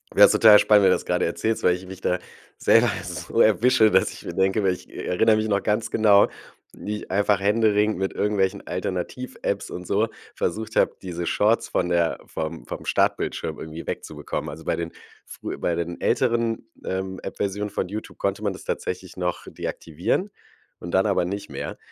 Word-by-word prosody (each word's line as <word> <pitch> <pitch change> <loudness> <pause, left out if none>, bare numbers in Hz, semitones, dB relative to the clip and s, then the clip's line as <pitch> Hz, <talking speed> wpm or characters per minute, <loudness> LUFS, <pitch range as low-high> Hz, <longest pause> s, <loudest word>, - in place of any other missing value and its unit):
Wär's - - +8
total 110 -2 +8
spannend, 105 -1 +5
wenn 95 - +6
du 90 - +5
das - - -6
gerade - - +1
erzählst, 110 0 -1
weil 90 - +4
ich 90 +1 -9
mich 95 0 -10
da 90 - +1 0.4
selber - - +4
so - - -2
erwische, 110 0 +5
dass - - +3
ich - - -12
mir - - -5
denke 95 +2 +1
weil 95 -1 +3
ich 90 - -11
erinnere 110 +5 +2
mich 110 0 0
noch 100 -2 +1
ganz 105 +1 -1
genau, 105 -2 +5 0.4
wie 105 +1 -5
ich - - -10
einfach 100 +1 +2
händeringend 105 0 +2
mit 95 - -1
irgendwelchen 100 -1 0
Alternativ-Apps 95 +7 -3
und - - -7
so - - +1 0.3
versucht 110 +5 -3
habe, - - +3
diese 85 -2 -4
Shorts 110 +3 +2
von 90 - 0
der 85 -2 +1
vom 80 +1 -5
vom - - -7
Startbildschirm - - 0
irgendwie 80 +1 -7
wegzubekommen. 75 - -5
Also, 80 +2 -9
bei - - +1
den 85 -1 -4 0.4
frühe - - -7
bei 85 - 0
den 85 0 -4
älteren, 115 -2 +1 0.2
ähm, 95 0 -3
App-Versionen 100 +1 -3
von 95 - -2
YouTube 105 +3 -7
konnte 100 +1 -1
man 100 -2 -1
das 95 - -11
tatsächlich 90 0 -4
noch 90 -1 -3
deaktivieren 90 - -3 0.5
und 85 - -7
dann 95 +4 +3
aber 100 -4 +2
nicht 100 +2 -5
mehr. - - -5
100 Hz, 185 wpm, -24 LUFS, 90-110 Hz, 0.5 s, Wär's